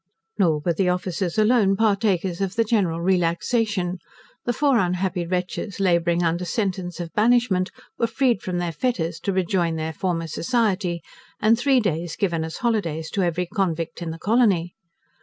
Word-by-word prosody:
Nor 160 -6 +3
were 170 +3 0
the 180 +2 +1
officers 180 0 -2
alone 215 -3 +4
partakers 200 -4 +1
of 195 0 -2
the 230 - +3
general 195 -7 0
relaxation. 180 +2 0 0.5
The 245 - +1
four 275 -1 +3
unhappy 180 -1 -1
wretches 185 +3 -3
labouring 175 -2 +2
under 170 +1 0
sentence 180 -2 -2
of 170 -1 -6
banishment 215 -4 +3 0.3
were 230 - +2
freed 235 -2 +1
from 180 -1 -3
their 175 -1 -1
fetters, 165 - -2
to 200 - -2
rejoin 180 -3 0
their 160 0 -3
former 170 0 -2
society; 185 0 0 0.4
and 215 +2 +4
three 260 +2 +3
days 170 -6 -2
given 170 -5 0
as 160 0 -5
holidays 175 -10 -1
to 200 - 0
every 180 0 0
convict 175 -4 -2
in 170 - -3
the 160 - -5
colony. 195 -4 +2
185 Hz, 160 wpm, -23 LUFS, 170-210 Hz, 0.5 s, alone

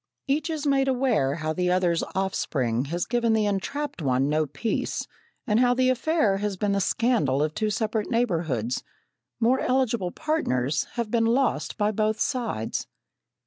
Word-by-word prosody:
Each 295 +5 0
is 310 -2 -3
made 275 -1 +2
aware 250 - +1
how 155 -1 -2
the 180 +1 0
other's 180 -2 +2
offspring 135 -10 0
has 170 +4 -2
given 235 -1 +1
the 220 -1 +2
entrapped 205 - -2
one 135 0 +1
no 155 0 +1
peace, 220 - -2 0.4
and 215 -3 +2
how 245 0 +4
the 255 0 +3
affair 255 -6 +1
has 205 -1 -2
been 205 +1 0
the 200 0 +1
scandal 180 - +1
of 155 0 -1
two 215 +3 -1
separate 215 0 -1
neighbourhoods, 165 - 0 0.6
more 245 +3 +3
eligible 235 -7 +1
partners 150 - -1
having 235 -3 -3
been 230 -1 +2
lost 260 +4 +1
by 210 -1 +2
both 215 +1 0
sides. 230 - -2
210 Hz, 160 wpm, -26 LUFS, 160-245 Hz, 0.6 s, how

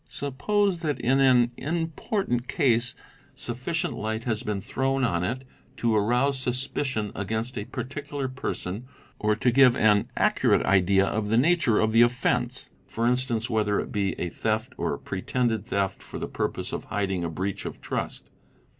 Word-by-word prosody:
Suppose 190 +7 0
that 155 -4 -2
in 135 +3 +2
an 125 -3 +5
important 165 - -2
case 120 -2 +1 0.4
sufficient 130 +8 -2
light 110 +1 -3
has 110 -3 -1
been 105 -2 -2
thrown 135 +6 -1
on 85 -8 +1
it 130 +8 -2 0.3
to 115 -2 +1
arouse 125 +6 +2
suspicion 130 -3 -1
against 110 +5 -3
a 105 - -3
particular 145 +2 -4
person 125 -4 -4 0.3
or 105 0 +2
to 120 +3 +2
give 125 -1 +6
an 105 -3 +3
accurate - - +3
idea 95 +1 +4
of 105 +1 -1
the 110 +2 +2
nature 145 -5 +3
of 110 0 +2
the 115 +1 +5
offence 125 0 +1 0.2
(for 115 - -2
instance, 120 -2 +1
whether 105 -3 +1
it - - -4
be 100 -2 -1
a 90 - -1
theft 110 +7 -1
or - - -1
a - - -11
pretended 115 -4 -1
theft 100 -3 -1
for - - -8
the - - -4
purpose - - -3
of - - -4
hiding 95 -4 -1
a 85 - -1
breach 95 +4 -3
of - - -7
trust). - - -4
120 Hz, 165 wpm, -26 LUFS, 105-130 Hz, 0.4 s, give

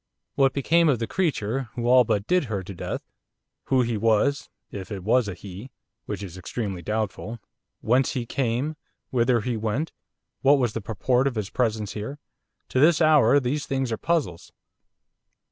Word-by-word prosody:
What 135 -1 +3
became 165 +4 +3
of 135 - +3
the 115 - -2
creature 135 - -1
who 120 - -3
all 125 0 +7
but 105 -3 0
did 180 +1 +2
her 100 -5 -3
to 95 - -8
death; 85 - -5 0.6
who 130 -2 +3
he 115 -2 -1
was 115 +6 +2 0.2
if 95 0 -7
it 95 -3 -5
was 115 +2 +3
a 100 - -4
'he,' 100 +6 -9 0.4
which 105 -1 -4
is 95 -1 -8
extremely 95 -1 -4
doubtful; 110 +3 -3 0.4
whence 125 +4 +2
he 125 -4 -2
came; 130 +5 -1 0.3
whither 120 -1 +2
he 120 +2 -2
went; 110 +8 -2 0.5
what 140 +2 +5
was 120 -5 0
the 115 - -3
purport 125 +6 +1
of 130 - -2
his 105 -3 -3
presence 110 -4 -1
here, 110 +7 -5 0.5
to 130 - 0
this 155 +3 +5
hour 145 -5 +5
these 140 +3 -2
things 135 -3 -1
are 110 - -1
puzzles. 145 - -1
120 Hz, 175 wpm, -25 LUFS, 105-135 Hz, 0.6 s, all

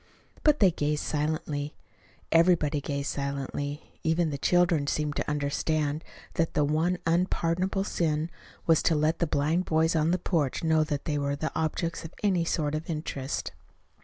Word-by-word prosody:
But 300 -1 +4
they 195 -4 +6
gazed 150 -1 -1
silently. 150 -1 -2 0.6
Everybody 165 -3 +4
gazed 140 0 -2
silently. 140 +1 -4
Even 160 0 +1
the 140 - -3
children 175 -3 +3
seemed 150 0 -1
to - - -1
understand 150 +1 0 0.3
that 165 -1 0
the 150 - +3
one 160 +5 +1
unpardonable 180 +2 +1
sin 160 -4 -1 0.3
was 165 -2 +4
to 165 - +3
let 155 +2 +1
the 170 - +1
blind 155 +5 +1
boys 160 +1 +2
on 155 0 +2
the 180 - +3
porch 165 -6 -1
know 160 -1 +4
that 145 -2 -3
they 150 -2 0
were 140 0 0
the 155 +2 -3
objects 165 +1 -2
of 165 - -9
any 185 -4 +3
sort 150 -3 0
of 155 +2 -4
interest. 150 -4 -3
155 Hz, 160 wpm, -28 LUFS, 145-170 Hz, 0.6 s, they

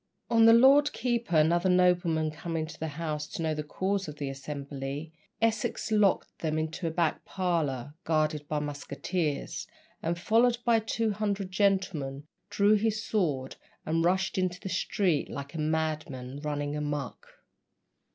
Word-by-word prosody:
On 225 -1 +6
the 225 - +9
Lord 275 +5 +6
Keeper 235 -6 -1
and 155 +2 +5
other 175 +2 +2
noblemen 175 -3 +3
coming 160 +1 -3
to 160 - -11
the 160 - -2
house 150 0 -4
to 165 - -5
know 160 -1 +1
the 155 - -3
cause 190 +6 -2
of 150 - -7
the 140 -2 -4
assembly, 140 +2 -6 0.3
Essex 225 0 0
locked 210 -3 +2
them 155 -1 -1
into 160 +2 -2
a - - +1
back 160 -1 0
parlour, 150 -8 -1
guarded 155 -2 0
by 150 - -1
musketeers, 145 +2 -3 0.3
and 170 +1 -1
followed 230 +6 +3
by 235 -2 +5
two 225 0 -1
hundred 200 -2 -2
gentlemen, 185 -9 0 0.3
drew 205 +1 +4
his 215 +1 +1
sword 145 -11 -1 0.3
and 165 +1 +1
rushed 190 +2 +1
into 180 -1 -1
the 190 - -6
street 180 -3 0
like 140 0 -6
a 165 - -5
madman 155 -4 -2
"running 145 -1 -2
a 150 - -2
muck." 145 -3 -4
165 Hz, 160 wpm, -29 LUFS, 150-195 Hz, 0.3 s, the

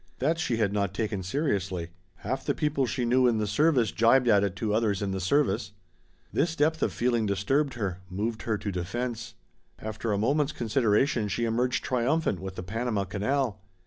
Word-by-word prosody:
That 160 +5 0
she 125 -8 0
had 105 -3 +1
not 100 -2 -1
taken 105 -3 -2
seriously; 95 - -2 0.2
half 130 +6 -4
the - - 0
people 145 -4 0
she 125 +1 -1
knew 125 +1 +4
in 115 -2 +2
the 105 - 0
service 125 +1 +2
jibed 125 +3 +4
at 105 -3 +5
it 100 -2 -1
to 105 +1 -1
others 105 -3 +1
in 100 - -1
the 95 - -2
service. 100 -1 +1 0.6
This 165 0 +1
depth 160 +1 +1
of - - +1
feeling 120 -3 +1
disturbed 130 +9 0
her, 95 -6 -3
moved 110 +5 -3
her 110 -2 -1
to 100 - -4
defense. 115 +6 -4 0.4
After 110 +1 -4
a 100 - +1
moment's 145 +7 +1
consideration 115 0 +1
she 110 +4 -1
emerged 120 +2 0
triumphant 130 - 0
with 95 0 -6
the 90 - -5
Panama 110 +1 -1
canal. 105 +2 -1
115 Hz, 185 wpm, -28 LUFS, 100-130 Hz, 0.6 s, at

